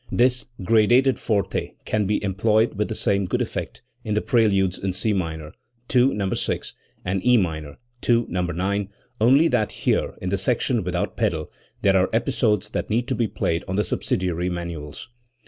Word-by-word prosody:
This 125 +1 +2 0.2
gradated 120 +6 +4
forte 105 -3 -1
can 105 -2 0
be 105 +1 0
employed 105 +3 +2
with 105 +1 -1
the 110 - -4
same 100 -3 +1
good - - -1
effect - - -4 0.2
in 105 - -2
the 105 - +2
preludes 100 -7 +2
in 95 -1 -2
C 105 +3 0
minor 80 -4 -3 0.4
(II, 125 0 +6
No. 100 -2 -1
6) - - -2 0.3
and' 95 +1 -1
E 125 +1 +5
minor 80 -7 -2 0.3
(II, 120 -1 +4
No, 90 +1 -2
9), 95 +3 -1 0.3
only 135 +8 +6
that 110 -4 +1
here, - - 0
in 90 - -3
the 100 +1 0
section 120 +1 0
without 90 0 -2
pedal, 80 -2 -1 0.3
there 95 -1 +4
are 95 - +2
episodes 110 -4 +1
that - - -3
need 115 +3 0
to - - +1
be 115 - +1
played 85 -3 -1
on 95 - -2
the 105 - +2
subsidiary 90 -3 -1
manuals. 85 -4 -6
100 Hz, 180 wpm, -23 LUFS, 90-115 Hz, 0.4 s, II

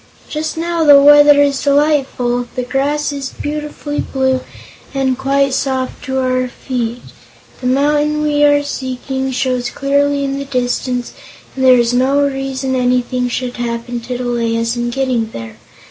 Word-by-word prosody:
Just 315 +1 -4
now 335 0 -1
the 290 -2 +8
weather 290 0 +7
is 280 -1 0
delightful; 275 -4 +1
the 250 - -2
grass 285 +4 -1
is 275 -2 -4
beautifully 295 0 -5
blue 265 -1 0 0.6
and 265 -1 +1
quite 275 +1 +1
soft 260 -1 -2
to 265 0 -2
our 255 0 0
feet; 245 -1 -4 0.6
the 250 - -3
mountain 295 +3 +1
we 295 -1 +2
are 290 0 +4
seeking 265 -1 -4
shows 255 -1 -1
clearly 280 0 0
in 275 0 -2
the 280 - -5
distance 250 -1 -2 0.4
and 265 - -2
there 255 -1 +7
is 240 0 +1
no 265 +3 +2
reason 270 -1 -1
anything 250 0 0
should 245 0 -4
happen 240 0 -3
to 245 +1 -5
delay 240 -2 -1
us 230 +1 -1
in 240 0 -2
getting 245 -3 -1
there. 115 -1 -8
265 Hz, 155 wpm, -16 LUFS, 250-285 Hz, 0.6 s, the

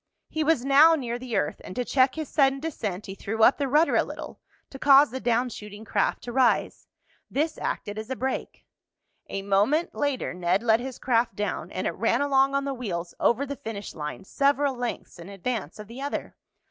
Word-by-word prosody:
He 315 - -1
was 300 -5 +2
now 295 +4 +7
near 240 -5 -3
the 245 -3 -5
earth, 150 - -1
and 185 - -9
to 250 - -1
check 260 0 +3
his 315 -2 -4
sudden 275 -2 +2
descent 215 - -4
he 190 - -6
threw 220 +3 -2
up 250 - +6
the 280 - 0
rudder 300 +5 +3
a - - +5
little, - - -8 0.3
to 270 - -9
cause 280 -2 +6
the 260 - -4
down 240 +1 +1
shooting 210 -1 -9
craft - - 0
to 240 - -6
rise. 255 -1 +1 0.4
This 310 +3 -1
acted 205 +1 -3
as 220 +2 -7
a 260 - -2
brake. 260 +1 -4 0.6
A 195 - -4
moment 205 +12 +2
later 285 -8 -1
Ned 180 +3 0
let 225 -1 +4
his 255 +1 -6
craft 235 -4 +1
down, 205 +1 -3
and - - -4
it - - +1
ran - - +1
along 275 -1 +3
on 275 0 0
the 275 - -2
wheels 180 -9 -4
over 255 +4 +2
the 280 0 -5
finish 220 -6 -7
line, 150 +5 -6
several 280 +5 +1
lengths 245 -6 -5
in 170 +3 -10
advance 200 -2 -4
of 210 - -8
the 235 +4 -9
other. 285 +1 -4
250 Hz, 210 wpm, -26 LUFS, 210-275 Hz, 0.6 s, now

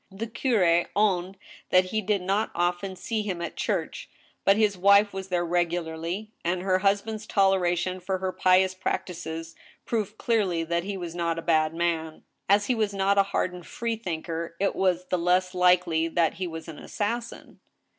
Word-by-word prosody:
The 200 +3 -5
curi 215 -8 +2
owned 195 -2 +1 0.3
that 185 0 +3
he 220 - 0
did 200 -2 0
not 195 +4 0
often 175 +2 -1
see 220 +3 -2
him 195 -4 -3
at 170 - -5
church, - - -3 0.3
but 195 +1 +4
his 210 -2 +2
wife 200 +2 +5
was 190 0 -5
there 175 -2 0
regularly, 175 +3 -2
and 175 +1 -1
her 185 -1 +2
husband's 205 +2 0
toleration 185 -2 +2
for 185 +1 -2
her 185 0 -2
pious 185 0 +3
prac 185 - -2
tices 165 -2 -7 0.3
proved 215 -2 -2
cleariy 190 -8 0
that 170 +1 -1
he 200 -1 -4
was 175 -3 -6
not 170 -1 -1
a 165 - -4
bad 155 -1 +2
man. 165 -2 -2 0.3
As 205 +1 +4
he 255 - +1
was 215 -3 -1
not 195 +1 +2
a - - +6
hardened 180 -4 -2
freethinker, 170 -7 -4
it 200 0 +1
was 180 -1 +1
the 180 -1 -1
less 180 +2 +2
likely 180 -3 +3
that 165 0 +1
he 185 - 0
was 160 -1 -7
an 160 -2 -9
assassin. 230 +3 -4
185 Hz, 175 wpm, -26 LUFS, 170-200 Hz, 0.3 s, a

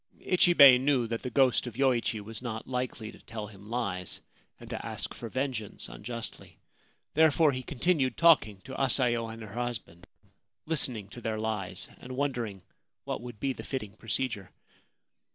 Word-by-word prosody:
Ichibei 170 -8 +7
knew 130 -2 +2
that 115 0 -3
the 125 - -4
ghost 130 -1 +3
of 120 - -7
Yoichi 125 -4 +1
was 110 +2 -6
not 115 -3 -5
likely 125 -3 -3
to - - -15
tell 110 -2 -6
him 105 0 -13
lies, 100 -7 -2 0.4
and - - -11
to - - -4
ask - - -4
for 115 - -7
vengeance 130 -5 -3
unjustly. 110 - -6 0.6
There 160 +1 +6
fore 155 0 +4
he 130 -1 -3
continued 135 +1 +1
talking 150 - +5
to 130 - -9
Asayo 120 -3 +3
and 115 0 -8
her 105 -2 -9
husband, 115 -7 -5 0.6
listening 130 -10 0
to 120 - -10
their 110 -2 -2
lies, 110 -4 -3
and 130 0 -8
wondering 120 -9 -2 0.4
what - - -4
would 120 -3 -9
be 135 +3 0
the - - -8
fitting 110 -7 -4
procedure. 115 -4 -2
120 Hz, 165 wpm, -30 LUFS, 110-130 Hz, 0.6 s, Ichibei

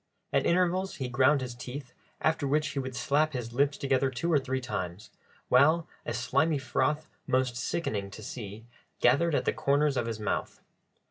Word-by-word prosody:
At - - +3
intervals 185 +2 +1
he 130 -3 -4
ground 135 +3 +4
his 125 -2 -4
teeth, 125 +2 -8 0.3
after 160 -3 +1
which 150 +2 +1
he 140 - -3
would 130 -1 -4
slap 150 +4 +1
his 120 -2 -4
lips 140 +2 +2
together 135 -1 +1
two 135 +7 -1
or 145 - +5
three 130 0 -2
times, 105 -5 -5 0.4
while 155 +6 +4 0.2
a 120 - -1
slimy 155 +5 +2
froth, 150 +3 0 0.2
most 130 -1 +1
sickening 110 - -2
to 105 +2 -10
see, 105 0 -7 0.3
gathered 145 +6 +4
at - - 0
the - - +2
corners 140 0 +2
of 120 - 0
his 115 -1 -3
mouth. 105 -2 -3
130 Hz, 180 wpm, -29 LUFS, 120-150 Hz, 0.4 s, or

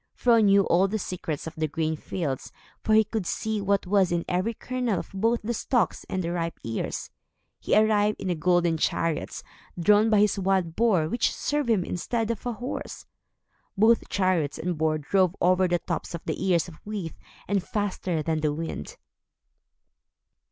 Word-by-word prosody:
Fro 235 -2 +4
knew 200 -1 +5
all 185 +3 +3
the 215 +3 -2
secrets 175 -6 -4
of 160 - -6
the 155 0 -1
grain 160 +1 -1
fields, 150 -4 -4 0.3
for 215 - +3
he 220 - +6
could 215 -4 -4
see 220 -1 -2
what 200 0 +1
was 190 -1 +2
in 170 -1 0
every 185 +6 -1
kernel 250 -5 -2
of - - -6
both 225 +4 +1
the 235 +3 -1
stalks 235 -1 0
and 185 -1 -2
the 170 - -2
ripe 170 -1 -3
ears. 115 -1 -4 0.5
He - - +1
arrived, 215 -1 +3
in 185 - -2
a - - +2
golden 175 0 +2
chariot, 165 0 -1 0.4
drawn 210 +5 +4
by 210 -2 +4
his 210 -1 +2
wild 185 -3 0
boar 205 -9 +3
which 235 +8 +1
served 290 -4 -1
him 210 -6 +3
instead 225 +6 -2
of 230 +2 -5
a 240 - -1
horse. 245 +4 -6 0.7
Both 225 +3 +4
chariot 185 -7 +1
and 180 0 -2
boar 155 0 +1
drove 185 +4 +1
over 185 +1 +3
the 175 0 +2
tops 170 - -4
of 165 - -9
the 190 - -2
ears 175 -2 +2
of 165 -3 -13
wheat, 205 -6 -5 0.3
and 200 -1 +1
faster 185 -5 -2
than 160 -1 -1
the 150 -1 +1
wind. 160 - -5
185 Hz, 180 wpm, -26 LUFS, 165-215 Hz, 0.7 s, he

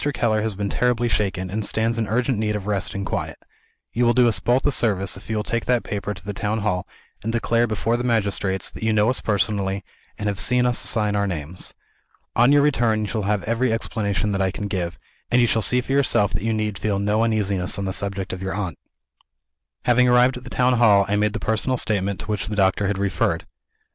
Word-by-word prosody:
Keller 110 -2 +1
has 110 -2 -2
been 100 0 -2
terribly 120 +1 +1
shaken, 95 -5 -1
and 110 +2 -2
stands 115 +2 0
in 110 - -1
urgent 120 +1 0
need 105 -1 0
of 100 -2 -4
rest 100 -3 -2
and 100 0 -3
quiet. - - -3 0.6
You 120 - +1
will 120 0 +3
do 125 -1 +5
us 115 - +1
both 125 +2 +1
a 145 - +3
service 100 - 0
if 95 - -13
you 110 - -1
will 105 - -1
take 115 +1 -2
that 125 -2 +2
paper 105 0 -4
to 90 - -14
the 105 - -4
town 110 +1 -2
hall, 95 -4 -1 0.3
and 115 - -2
declare 115 0 +1
before 110 +2 0
the 120 - -3
magistrates 100 -5 0
that - - -11
you 110 0 +1
know 105 +3 +3
us 130 - -1
personally, 100 -1 0 0.3
and 105 - -5
have 100 -2 -1
seen 125 +3 +2
us 125 -1 +1
sign 105 -2 +1
our 100 0 +1
names. 85 0 -5 0.6
On 120 +3 +5
your 145 0 +5
return, 120 -7 +2
you - - -1
shall 110 +1 -2
have 105 -2 0
every 115 +2 0
explanation 105 -2 -1
that 100 -1 -1
I 95 - +2
can 100 +2 -4
give; 90 -3 -3 0.3
and 125 - +3
you 120 - +5
shall 115 -1 +1
see 125 +5 +2
for 135 - -7
yourself 135 -7 +2
that - - -2
you 115 +2 0
need 105 -3 -2
feel 105 -2 0
no 105 +2 +1
uneasiness 100 -5 0
on 100 - -3
the 95 - -2
subject 100 -1 -3
of 95 - -6
your 95 0 -3
aunt." 95 -5 -4 1.1
Having 125 +1 +4
arrived 125 +1 +4
at 125 - -10
the 125 - -9
town 125 -1 +2
hall, 100 -4 +5
I 100 - +1
made 105 0 +1
the 115 - -3
personal 110 +5 0
statement 100 -4 -1
to - - -7
which 105 -2 -2
the 105 - -3
doctor 95 0 +2
had 100 0 -1
referred. 95 -3 0
105 Hz, 240 wpm, -22 LUFS, 100-115 Hz, 1.1 s, do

